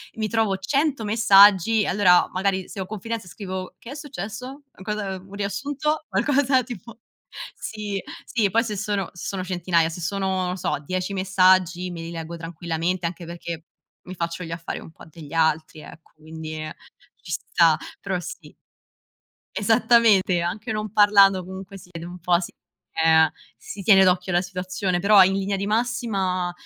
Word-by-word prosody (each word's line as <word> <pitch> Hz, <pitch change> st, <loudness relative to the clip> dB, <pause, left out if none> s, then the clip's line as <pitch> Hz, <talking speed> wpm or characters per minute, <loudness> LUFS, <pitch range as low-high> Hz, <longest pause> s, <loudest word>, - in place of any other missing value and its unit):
mi 220 Hz, -1 st, -2 dB
trovo 215 Hz, -3 st, +1 dB
100 275 Hz, +5 st, 0 dB
messaggi 210 Hz, -1 st, +5 dB
e -, -, -2 dB
allora 180 Hz, -2 st, +4 dB
magari 190 Hz, 0 st, -1 dB
se 210 Hz, -, -9 dB
ho 190 Hz, -, -4 dB
confidenza 220 Hz, 0 st, -5 dB
scrivo: 185 Hz, -1 st, -6 dB
"Che 235 Hz, -, -11 dB
è -, -, -7 dB
successo? 260 Hz, -, -7 dB, 0.2 s
Cosa 205 Hz, -1 st, -3 dB
un 190 Hz, +2 st, -15 dB
riassunto?" 285 Hz, +9 st, -2 dB
Qualcosa 270 Hz, -2 st, +2 dB
tipo 235 Hz, -1 st, -10 dB, 0.6 s
sì, 210 Hz, -2 st, -5 dB, 0.3 s
sì, 220 Hz, -6 st, 0 dB
poi 230 Hz, +3 st, +3 dB
se 215 Hz, -4 st, -4 dB
sono 200 Hz, -2 st, -2 dB
sono 185 Hz, +1 st, -5 dB
centinaia, 175 Hz, -2 st, +1 dB
se 165 Hz, +2 st, -7 dB
sono, 190 Hz, +1 st, -1 dB
non 180 Hz, 0 st, -2 dB
so, 180 Hz, -, -1 dB
10 185 Hz, +4 st, -3 dB
messaggi 185 Hz, -1 st, +3 dB
me 170 Hz, -2 st, -7 dB
li 165 Hz, 0 st, -7 dB
leggo 165 Hz, 0 st, -6 dB
tranquillamente 170 Hz, +1 st, -3 dB
anche 170 Hz, +1 st, -7 dB
perché 170 Hz, -1 st, -7 dB, 0.4 s
mi 185 Hz, -, -9 dB
faccio 170 Hz, 0 st, -4 dB
gli 165 Hz, -, -7 dB
affari 165 Hz, 0 st, -5 dB
un -, -, -12 dB
po' -, -, -15 dB
degli 155 Hz, -1 st, -12 dB
altri, 160 Hz, -1 st, +1 dB
ecco, 165 Hz, -, -14 dB
quindi, 155 Hz, 0 st, -8 dB
ehm, 155 Hz, 0 st, -6 dB, 0.5 s
ci -, -, -10 dB
sta, 165 Hz, -2 st, +3 dB, 0.3 s
però 190 Hz, -2 st, -2 dB
sì. 175 Hz, -, -9 dB, 1.0 s
Esattamente, 215 Hz, -4 st, +4 dB
anche 200 Hz, +7 st, -3 dB
non 215 Hz, -1 st, -3 dB
parlando 200 Hz, -3 st, +5 dB
comunque 190 Hz, +1 st, -9 dB
si 180 Hz, -, -15 dB
vede 165 Hz, 0 st, -7 dB
un 180 Hz, +1 st, -9 dB
po', 175 Hz, 0 st, +2 dB
si 175 Hz, -, -6 dB, 0.5 s
ehm, 160 Hz, -1 st, +6 dB, 0.3 s
si 200 Hz, -, -9 dB
tiene 195 Hz, -1 st, +7 dB
d'occhio 185 Hz, 0 st, +2 dB
la 175 Hz, -, +3 dB
situazione, 185 Hz, 0 st, -3 dB
però 200 Hz, +2 st, +6 dB
in 190 Hz, +1 st, +2 dB
linea 195 Hz, +1 st, -1 dB
di 200 Hz, +1 st, -3 dB
massima 205 Hz, -6 st, -1 dB
190 Hz, 165 wpm, -23 LUFS, 175-210 Hz, 1.0 s, tiene